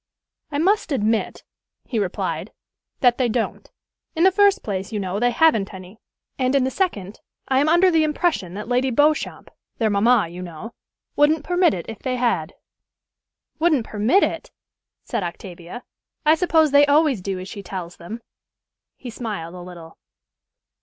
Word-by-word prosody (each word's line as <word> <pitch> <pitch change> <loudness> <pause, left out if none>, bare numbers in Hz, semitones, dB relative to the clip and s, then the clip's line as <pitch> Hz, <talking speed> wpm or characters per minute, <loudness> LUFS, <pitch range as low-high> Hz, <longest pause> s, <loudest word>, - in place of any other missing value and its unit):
"I 285 - -2
must 375 +3 +1
admit," 225 -4 -1 0.4
he 235 - -2
replied, 195 -4 -3 0.5
"that 245 -1 +4
they 250 -2 +2
don't. 225 0 -3 0.5
In 325 - +1
the 380 - +6
first 405 +1 +3
place, 195 -1 -4
you 215 - -2
know, 190 0 -3
they 245 +1 +3
haven't 230 -8 +2
any; 185 +3 -12 0.4
and, 255 +1 +1
in 275 - +3
the 260 - -1
second, 215 - -2 0.3
I 265 0 +2
am 295 +2 +2
under 355 +3 +5
the 325 -2 +3
impression 305 - -1
that 210 +2 -6
Lady 250 +2 +1
Beauchamp 295 +5 0 0.3
their 220 -2 +1
mamma, 215 +1 +3
you 175 +2 -9
know 180 +6 -8 0.4
wouldn't 295 +1 +3
permit 355 - +2
it 170 - -6
if 225 - -8
they 255 -1 -2
had." 230 -11 -1 1.0
"Wouldn't 310 -8 +2
permit 225 - +2
it!" - - -2 0.5
said - - -3
Octavia. 175 +4 -8 0.4
"I 305 - +6
suppose 320 -2 +3
they 285 0 +6
always 290 - +3
do 195 0 -3
as 185 +1 -7
she 200 +1 -8
tells 180 -3 -7
them?" 225 +7 -8 0.7
He 245 - -8
smiled 210 -8 -5
a 180 - -9
little. 175 -2 -12
235 Hz, 165 wpm, -22 LUFS, 195-300 Hz, 1.0 s, the